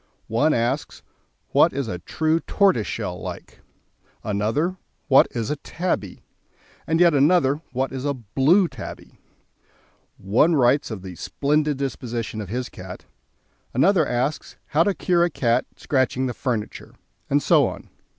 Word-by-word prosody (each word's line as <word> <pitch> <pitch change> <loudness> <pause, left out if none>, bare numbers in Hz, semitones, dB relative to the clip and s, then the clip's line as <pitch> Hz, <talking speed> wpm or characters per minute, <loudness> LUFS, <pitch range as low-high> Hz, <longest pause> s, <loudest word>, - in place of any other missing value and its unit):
One 145 +7 +3
asks: 125 +3 -1 0.5
"What - - +4
is 135 -2 -2
a 90 -4 -4
true 160 - 0
tortoiseshell 165 - 0
like?" - - -8 0.6
Another: 110 - -1 0.3
"What 135 - +6
is 115 0 -3
a 150 - -2
tabby?" 160 - -3 0.6
and 160 0 +1
yet 175 -2 +6
another: 145 0 +3
"What 130 +1 -1
is 130 -1 -5
a 140 -1 -1
blue 135 - +2
tabby?" 120 -10 -10 1.0
One 120 - +3
writes 135 +1 +3
of 105 -5 -6
the 95 -1 -7
"splendid 150 - 0
disposition" 120 -5 -4
of 100 - -7
his 125 +3 -3
cat, 90 0 -10 0.7
another 175 - +4
asks 125 +5 -2
how 150 - +2
to 200 - +1
cure 175 -2 +2
a 175 - +2
cat 120 -5 0
scratching 130 -1 0
the 125 - -2
furniture, 115 -4 -4 0.3
and - - +3
so - - +4
on. - - -8
135 Hz, 140 wpm, -23 LUFS, 115-155 Hz, 1.0 s, What